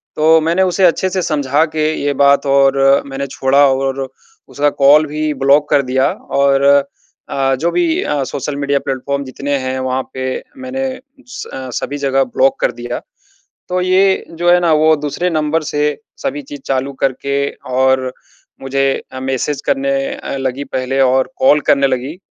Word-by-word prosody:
तो 160 Hz, +1 st, +5 dB
मैंने 170 Hz, +4 st, +1 dB
उसे 185 Hz, +1 st, +2 dB
अच्छे 185 Hz, +2 st, +2 dB
से 185 Hz, 0 st, -1 dB
समझा 145 Hz, 0 st, +1 dB
के 155 Hz, 0 st, +1 dB
ये 145 Hz, -, +1 dB
बात 140 Hz, 0 st, +4 dB
और 135 Hz, 0 st, +3 dB, 0.3 s
मैंने 135 Hz, 0 st, -4 dB
छोड़ा 140 Hz, +2 st, +3 dB
और 135 Hz, 0 st, -1 dB, 0.4 s
उसका 145 Hz, +1 st, +1 dB
कॉल 150 Hz, +3 st, +6 dB
भी 155 Hz, 0 st, -2 dB
ब्लॉक 145 Hz, +2 st, +4 dB
कर 140 Hz, -, +4 dB
दिया। 130 Hz, +1 st, +2 dB
और 140 Hz, 0 st, +1 dB, 0.7 s
अ, 135 Hz, -1 st, 0 dB
जो 170 Hz, +6 st, -1 dB
भी 345 Hz, +1 st, +1 dB
अ, 145 Hz, -2 st, -1 dB
सोशल 140 Hz, +2 st, -4 dB
मीडिया 140 Hz, 0 st, 0 dB
प्लेटफॉर्म 140 Hz, +1 st, -3 dB
जितने 140 Hz, +2 st, -3 dB
हैं 130 Hz, 0 st, -3 dB
वहाँ 130 Hz, 0 st, -1 dB
पे 130 Hz, 0 st, -4 dB, 0.3 s
मैंने 265 Hz, +1 st, -4 dB, 0.4 s
स 250 Hz, -, -8 dB, 0.3 s
सभी 145 Hz, -, -4 dB
जगह 135 Hz, -1 st, +1 dB
ब्लॉक 270 Hz, +3 st, +1 dB
कर -, -, +2 dB
दिया। 120 Hz, 0 st, -6 dB, 0.7 s
तो 180 Hz, 0 st, 0 dB
ये 190 Hz, +1 st, +2 dB
जो 175 Hz, 0 st, +2 dB
है 180 Hz, -, +5 dB
ना 170 Hz, -2 st, +2 dB
वो 155 Hz, +1 st, +4 dB
दूसरे 150 Hz, +5 st, -2 dB
नंबर 155 Hz, 0 st, 0 dB
से 150 Hz, 0 st, -2 dB, 0.4 s
सभी 285 Hz, +1 st, -3 dB
चीज़ 290 Hz, 0 st, -10 dB
चालू 135 Hz, +1 st, -1 dB
करके 140 Hz, +1 st, -1 dB, 0.4 s
और 130 Hz, -1 st, +2 dB, 0.5 s
मुझे 135 Hz, +1 st, 0 dB, 0.3 s
अ, 130 Hz, -, -6 dB
मैसेज 135 Hz, +2 st, -2 dB
करने 275 Hz, 0 st, +1 dB, 0.2 s
अ, 275 Hz, -, -6 dB
लगी 135 Hz, +1 st, -3 dB
पहले 130 Hz, +1 st, -2 dB
और 130 Hz, -, +2 dB
कॉल 260 Hz, -, +5 dB
करने 140 Hz, -1 st, +4 dB
लगी। 130 Hz, +5 st, -3 dB
140 Hz, 170 wpm, -16 LUFS, 135-165 Hz, 0.7 s, कॉल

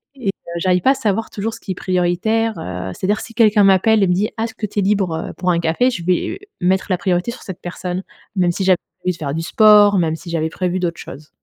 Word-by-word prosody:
Et 250 Hz, -6 st, -7 dB
heu, 170 Hz, -3 st, -4 dB
j'arrive 180 Hz, 0 st, +2 dB
pas 265 Hz, -, +5 dB
à -, -, +2 dB
savoir 220 Hz, -2 st, -1 dB
toujours 220 Hz, +2 st, -4 dB
ce -, -, -10 dB
qui 195 Hz, -, -5 dB
est -, -, -3 dB
prioritaire, 190 Hz, +6 st, 0 dB
heu, 90 Hz, +1 st, -5 dB
c'est-à-dire 205 Hz, +3 st, -1 dB
si 230 Hz, -, -9 dB
quelqu'un 215 Hz, -2 st, +5 dB
m'appelle 195 Hz, +2 st, +4 dB
et -, -, +3 dB
me -, -, +3 dB
dit: 200 Hz, +4 st, 0 dB
«Ah, 225 Hz, -, -1 dB
est-ce 230 Hz, -, -4 dB
que 215 Hz, -, -3 dB
tu 205 Hz, 0 st, -3 dB
es -, -, +3 dB
libre, 195 Hz, -4 st, +1 dB
heu, -, -, -8 dB
pour 180 Hz, -1 st, +1 dB
un 170 Hz, -, +1 dB
café?» 170 Hz, +10 st, +2 dB
Je 210 Hz, -9 st, -5 dB
vais 180 Hz, -, 0 dB, 0.2 s
mettre 185 Hz, +1 st, +1 dB
la 185 Hz, -, +1 dB
priorité 180 Hz, +4 st, 0 dB
sur -, -, -11 dB
cette 190 Hz, -3 st, -8 dB
personne, 180 Hz, +1 st, -5 dB, 0.3 s
même 180 Hz, -2 st, +2 dB
si 190 Hz, +2 st, -3 dB
j'avais 185 Hz, -1 st, +5 dB, 0.3 s
envie 180 Hz, -, +1 dB
de 170 Hz, -, -12 dB
faire 140 Hz, -3 st, -4 dB
du 165 Hz, -, -2 dB
sport, 205 Hz, +3 st, +5 dB
même 160 Hz, -2 st, 0 dB
si 170 Hz, +1 st, -11 dB
j'avais 160 Hz, -1 st, -1 dB
prévu 180 Hz, +1 st, -2 dB
d'autres 170 Hz, -2 st, -2 dB
choses. 150 Hz, +3 st, -10 dB
185 Hz, 270 wpm, -19 LUFS, 175-210 Hz, 0.3 s, pas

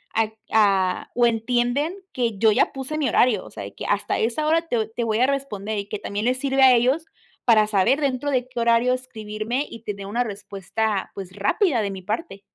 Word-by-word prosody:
a 220 Hz, 0 st, +1 dB, 0.2 s
a 195 Hz, -4 st, +2 dB
o 240 Hz, -1 st, +4 dB
entienden 245 Hz, +7 st, 0 dB, 0.2 s
que 230 Hz, -6 st, -2 dB
yo 220 Hz, 0 st, +5 dB
ya -, -, +2 dB
puse 270 Hz, +3 st, -4 dB
mi 300 Hz, -3 st, +1 dB
horario. 230 Hz, -6 st, +3 dB
O -, -, -12 dB
sea, -, -, -8 dB
de 100 Hz, -, -9 dB
que: -, -, -7 dB
"Hasta 205 Hz, 0 st, 0 dB
esa 240 Hz, +7 st, 0 dB
hora 325 Hz, +2 st, +3 dB
te 245 Hz, -, 0 dB
voy 220 Hz, -1 st, -1 dB
te 240 Hz, -, -1 dB
voy 220 Hz, -1 st, 0 dB
a 255 Hz, -, +4 dB
responder", 220 Hz, -7 st, -3 dB
y 200 Hz, 0 st, -4 dB
que 210 Hz, -, -4 dB
también 205 Hz, +2 st, -3 dB
le 250 Hz, -, +3 dB
sirve 270 Hz, +1 st, +1 dB
a 260 Hz, -1 st, +8 dB
ellos 260 Hz, +7 st, +2 dB, 0.4 s
para 220 Hz, -3 st, +5 dB
saber 215 Hz, +8 st, +2 dB
dentro 280 Hz, 0 st, 0 dB
de 255 Hz, -3 st, +1 dB
qué 255 Hz, -, -5 dB
horario 235 Hz, +2 st, +3 dB
escribirme 235 Hz, 0 st, -4 dB
y 230 Hz, -1 st, -11 dB
tener 200 Hz, -3 st, -5 dB
una 235 Hz, +4 st, 0 dB
respuesta, 205 Hz, 0 st, -3 dB
pues, 190 Hz, -2 st, -7 dB
rápida 240 Hz, -, +1 dB
de 200 Hz, -1 st, -2 dB
mi 190 Hz, -1 st, -7 dB
parte. 210 Hz, -, -4 dB
230 Hz, 220 wpm, -23 LUFS, 210-255 Hz, 0.4 s, a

